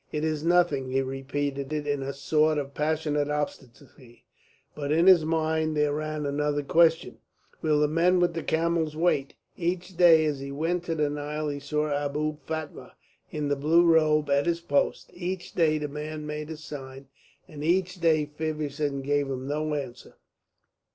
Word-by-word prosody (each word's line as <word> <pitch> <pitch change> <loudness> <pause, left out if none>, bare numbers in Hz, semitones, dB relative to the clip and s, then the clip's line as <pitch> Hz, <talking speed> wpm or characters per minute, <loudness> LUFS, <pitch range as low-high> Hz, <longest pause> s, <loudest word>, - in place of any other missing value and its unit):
"It 150 0 -2
is 155 -1 -1
nothing," 165 -6 +2
he 135 +1 +1
repeated 135 +1 -3
in 145 -2 -1
a 135 +1 -3
sort 155 +2 +1
of 140 -1 -4
passionate 150 -1 0
obstinacy; 130 -4 -6 0.5
but 145 -1 -4
in 165 +3 +3
his 185 -4 +7
mind 160 -1 0
there 150 -1 +2
ran 155 0 -3
another 145 +1 -1
question, 165 +2 +2 0.4
"Will 155 -2 +2
the 150 - +3
men 170 +4 +3
with 175 -1 +2
the 165 - -3
camels 160 -1 0
wait?" 155 -4 0 0.2
Each 180 +1 -3
day 165 -2 +6
as 150 -3 -1
he 140 0 -6
went 165 +5 -1
to 165 - -2
the 150 -1 +1
Nile 150 +1 -3
he 145 0 -4
saw 150 +2 -1 0.2
Abou 150 +1 -2
Fatma 160 -2 -6 0.4
in 150 -1 -3
the 145 - +2
blue 160 +5 +3
robe 155 -2 +4
at 140 +3 +2
his 170 -1 +1
post; 145 -4 -1
each 180 0 -5
day 155 -3 +2
the 150 -1 -3
man 150 +1 -6
made 150 0 -5
his 160 0 -8
sign, 135 -2 -9 0.4
and 150 -4 -9
each 180 +2 +1
day 160 -3 +3
Feversham 150 -2 -3
gave 145 0 +1
no 145 +4 -2
answer. 130 -4 -7
150 Hz, 170 wpm, -27 LUFS, 145-160 Hz, 0.5 s, his